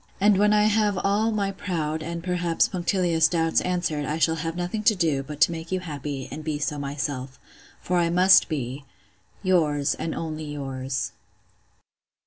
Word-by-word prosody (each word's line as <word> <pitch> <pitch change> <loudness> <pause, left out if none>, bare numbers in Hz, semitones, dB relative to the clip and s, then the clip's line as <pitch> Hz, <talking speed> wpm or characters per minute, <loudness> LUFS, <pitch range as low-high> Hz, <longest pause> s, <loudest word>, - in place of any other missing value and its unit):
And 200 0 +4
when 210 0 +4
I 210 0 +4
have 210 -2 +2
all 200 +4 +1
my 205 -3 -1
proud, 160 -5 -3
and, 170 +1 -5
perhaps, 175 -2 +1
punctilious 175 -2 +1
doubts 165 -1 +1
answered, 175 -5 -1
I 150 +3 -2
shall 165 0 +2
have 165 +1 -3
nothing 180 +5 -3
to 220 -2 +5
do, 160 -7 +1
but 145 +2 -8
to - - +6
make 165 0 -7
you 185 - 0
happy, 145 -5 -5
and 155 +2 -6
be 155 -1 -2
so 145 0 -2
myself. 140 -2 -4 0.4
For 180 0 0
I 170 -1 +2
must 180 +2 +5
be 135 -2 -4 0.6
'Yours, 155 -7 +2
and 160 - -4
only 155 -1 -4
yours. 135 -2 -4
165 Hz, 170 wpm, -25 LUFS, 150-185 Hz, 0.6 s, to